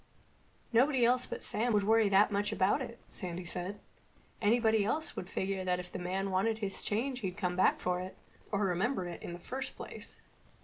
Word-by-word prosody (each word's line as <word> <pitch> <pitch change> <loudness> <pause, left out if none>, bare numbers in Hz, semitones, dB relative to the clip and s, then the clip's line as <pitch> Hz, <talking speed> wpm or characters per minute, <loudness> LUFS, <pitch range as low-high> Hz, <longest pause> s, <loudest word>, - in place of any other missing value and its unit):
"Nobody 255 +1 +4
else 250 +1 +3
but - - -5
Sam 235 +2 +1
would 205 -1 +3
worry 220 0 +4
that 200 +2 +5
much 205 0 0
about 195 +9 +2
it," 235 -2 -6
Sandy 180 -2 -5
said. 180 +3 -2 0.6
"Anybody 220 0 +4
else 310 +10 -1
would 180 - -5
figure 190 0 -2
that 180 -1 +1
if 180 0 -8
the - - -5
man 190 +2 -2
wanted 210 +4 +2
his 200 -3 -3
change 245 +5 -1
he'd 190 -6 -4
come 180 -1 -1
back 185 - +4
for 180 0 0
it—or 195 +2 -5
remember 190 +3 0
it 175 - -7
in 175 - -6
the - - -6
first 260 +9 -5
place." - - -9
200 Hz, 190 wpm, -32 LUFS, 185-230 Hz, 0.6 s, that